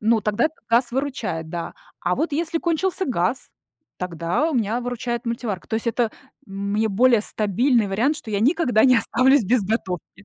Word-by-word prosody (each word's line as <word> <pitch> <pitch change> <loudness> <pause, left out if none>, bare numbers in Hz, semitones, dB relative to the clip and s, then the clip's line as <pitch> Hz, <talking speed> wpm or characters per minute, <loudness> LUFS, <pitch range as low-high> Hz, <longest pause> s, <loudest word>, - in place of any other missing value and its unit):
ну, 220 0 +2
тогда 210 +3 +1
этот 315 - -11
газ 235 +1 +3
выручает, 240 - -3
да. 170 0 -5 0.3
А - - 0
вот 320 -1 -2
если 330 +2 -1
кончился 355 +3 -1
газ, 240 - -1 0.5
тогда 180 - -1
у - - -3
меня 230 0 0
выручает 245 0 -4
мультиварка. 230 -5 -3
То 220 - -2
есть 225 - -2
это 230 -1 +1 0.4
мне 200 +3 -1
более 235 +3 +4
стабильный 220 +3 +1
вариант, 235 +10 +1
что 220 - -9
я 200 - 0
никогда 255 -3 +3
не 255 -2 +6
останусь 255 +3 +3
без 240 +3 +2
готовки. 195 -2 -4
230 Hz, 175 wpm, -22 LUFS, 200-260 Hz, 0.5 s, не